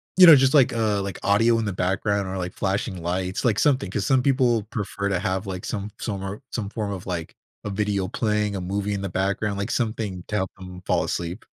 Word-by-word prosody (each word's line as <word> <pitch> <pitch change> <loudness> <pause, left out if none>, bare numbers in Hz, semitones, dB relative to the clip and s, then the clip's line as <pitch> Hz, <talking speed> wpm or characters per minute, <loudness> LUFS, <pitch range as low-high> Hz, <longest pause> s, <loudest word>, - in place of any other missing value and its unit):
you 185 -1 +9
know, 160 - +11
just, 135 0 +4
like, 135 -4 +5
a, 110 -3 +1
like, 100 -2 -4
audio 115 +3 +4
in 115 - -1
the 100 - -2
background 100 +2 0
or, 95 +1 -4
like, 90 -1 -4
flashing 95 -1 -2
lights, 90 +2 -2
like, 115 -4 +2
something 130 -9 +2
'cause 100 0 -2
some 130 -2 +3
people 125 -4 +3
prefer 100 -2 -3
to 100 - +1
have, 95 0 -2
like, 90 -1 -5
some 105 -1 -3
some 100 -4 -3
or 95 +2 -5
some 105 -4 -3
form 105 -2 -3
of, 95 -1 -6
like, 85 -3 -4 0.3
a 105 - -4
video 100 -1 0
playing, 105 -1 0
a 95 - -3
movie 100 +2 -2
in 100 - -3
the 100 - -3
background, 100 +3 -1
like, 100 - -3
something 110 -6 -2
to 105 - -3
help 95 -2 -1
'em 90 0 -9
fall - - +2
asleep. 85 +5 -4
100 Hz, 235 wpm, -24 LUFS, 95-110 Hz, 0.3 s, know